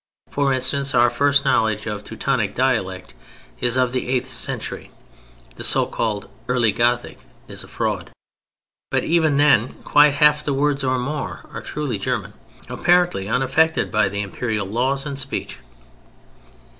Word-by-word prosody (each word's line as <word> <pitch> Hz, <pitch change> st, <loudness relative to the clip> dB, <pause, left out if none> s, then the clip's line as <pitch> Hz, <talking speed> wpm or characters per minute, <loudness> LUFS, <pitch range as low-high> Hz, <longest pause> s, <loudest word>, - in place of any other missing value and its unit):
For 140 Hz, -1 st, +1 dB
instance, 135 Hz, +1 st, +1 dB
our 120 Hz, 0 st, +5 dB
first 140 Hz, 0 st, +2 dB
knowledge 110 Hz, -5 st, +1 dB
of 105 Hz, -2 st, -4 dB
Teutonic 110 Hz, -2 st, -2 dB
dialect 110 Hz, -8 st, -1 dB, 0.5 s
is 120 Hz, +1 st, +1 dB
of 125 Hz, -1 st, +2 dB
the 125 Hz, -1 st, -3 dB
eighth 130 Hz, 0 st, 0 dB
century 130 Hz, -, -3 dB, 0.7 s
(the -, -, -6 dB
so -, -, +2 dB
called 105 Hz, -3 st, -3 dB, 0.2 s
Early 125 Hz, -3 st, +2 dB
Gothic 120 Hz, +3 st, 0 dB, 0.3 s
is -, -, -7 dB
a -, -, -13 dB
fraud) -, -, -3 dB, 0.8 s
but -, -, 0 dB
even 160 Hz, -4 st, +2 dB
then 140 Hz, -5 st, +4 dB
quite 145 Hz, -1 st, +5 dB
half 150 Hz, +1 st, +5 dB
the 140 Hz, -, -1 dB
words 140 Hz, 0 st, +1 dB
or 130 Hz, -1 st, +1 dB
more 145 Hz, +4 st, -4 dB
are -, -, -5 dB
truly 145 Hz, -9 st, -4 dB
German, -, -, -3 dB, 0.3 s
apparently 175 Hz, -, +1 dB
unaffected 135 Hz, +7 st, +1 dB
by 105 Hz, -2 st, +2 dB
the 100 Hz, +1 st, -3 dB
Imperial 105 Hz, +1 st, -3 dB
laws 130 Hz, +7 st, -1 dB
and 140 Hz, -2 st, -2 dB
speech. 140 Hz, 0 st, -4 dB
130 Hz, 145 wpm, -21 LUFS, 110-140 Hz, 0.8 s, our